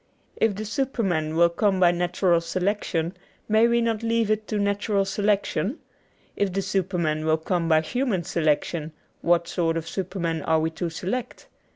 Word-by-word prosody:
If 220 -3 +1
the 215 +2 -5
superman 200 - -1
will 170 +1 +5
come 190 +2 +1
by 175 -2 +6
natural 175 0 +1
selection, 180 -1 -1 0.3
may 220 +2 +4
we 235 0 +2
not 230 -2 0
leave 230 -1 +1
it 215 0 -1
to 215 - -2
natural 200 0 +1
selection? 205 - 0 0.6
If 200 -3 0
the 195 +1 -1
superman 180 -5 -1
will 160 0 +2
come 170 +1 -1
by 155 -1 +5
human 235 0 -1
selection, 155 0 -1 0.3
what 170 0 +2
sort 165 -2 0
of 165 - -4
superman 175 -4 -3
are 160 +2 +2
we 160 +1 0
to 170 +1 -3
select? 200 +9 -4
185 Hz, 165 wpm, -25 LUFS, 165-210 Hz, 0.6 s, by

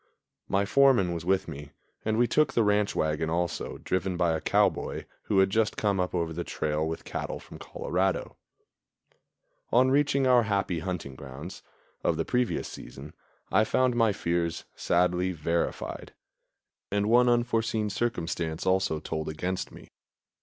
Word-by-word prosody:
My 100 +1 +1
foreman 120 -7 +4
was 85 -1 -5
with 95 +1 +1
me, 75 -2 -8 0.3
and 110 0 0
we 120 - +4
took 150 +6 +2
the 115 - +3
ranch 105 0 +2
wagon 80 +1 0
also, 85 +1 -2
driven 95 -1 -1
by 85 -2 +2
a 80 - -2
cowboy - - +1 0.2
who 100 - 0
had 95 0 +4
just 110 0 +1
come 100 -3 +1
up 90 0 -1
over 85 -2 -1
the 85 +2 -3
trail 75 -1 -2
with 80 0 -4
cattle - - -4
from - - -12
Colorado. 95 +1 -2 1.4
On 130 +2 +4
reaching 140 -1 +3
our 125 -2 +6
happy 100 -5 0
hunting 80 -5 -4
grounds 70 +8 -9 0.4
of 80 - +1
the 80 - -1
previous 125 -1 0
season, 70 +5 -10 0.4
I 105 +3 +5
found 125 +2 +2
my 115 -2 +4
fears 85 -3 -1
sadly 90 +1 +1
verified; 85 +1 -3 0.7
and 100 +1 0
one 120 +2 +5
unforeseen 115 -3 +1
circumstance 85 -8 -2
also 95 -4 +1
told 80 0 -4
against 90 +4 -3
me. - - -14
95 Hz, 155 wpm, -28 LUFS, 80-110 Hz, 1.4 s, our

